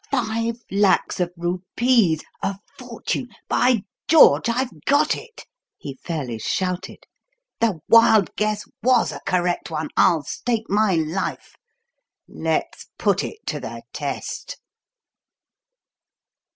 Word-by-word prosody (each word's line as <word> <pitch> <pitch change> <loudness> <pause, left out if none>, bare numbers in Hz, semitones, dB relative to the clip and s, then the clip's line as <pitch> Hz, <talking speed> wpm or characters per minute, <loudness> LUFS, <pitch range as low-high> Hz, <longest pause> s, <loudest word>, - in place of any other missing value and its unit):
"Five 230 -2 -1
lacs 200 -1 +2
of 175 -1 0
rupees 180 +1 +1 0.2
a 195 0 -2 0.2
fortune! 250 0 -4 0.2
By 245 -5 +2 0.2
George, 235 - +6
I've 250 +2 -2
got 290 +2 +3
it!" 460 -2 -11 0.3
he 140 - -7
fairly 135 -9 -4
shouted. 180 - -3 0.6
"The 215 -9 0
wild 225 -4 +5
guess 210 0 -1 0.2
was 255 +3 +3
a - - -8
correct 180 -1 0
one, 155 -1 -3
I'll 170 -5 +4
stake 225 - -2
my 205 -2 +2
life. 160 +4 -3 0.7
Let's - - -3
put - - +1
it 445 - -8
to - - -3
the - - -7
test." - - -5
210 Hz, 110 wpm, -22 LUFS, 175-240 Hz, 0.7 s, George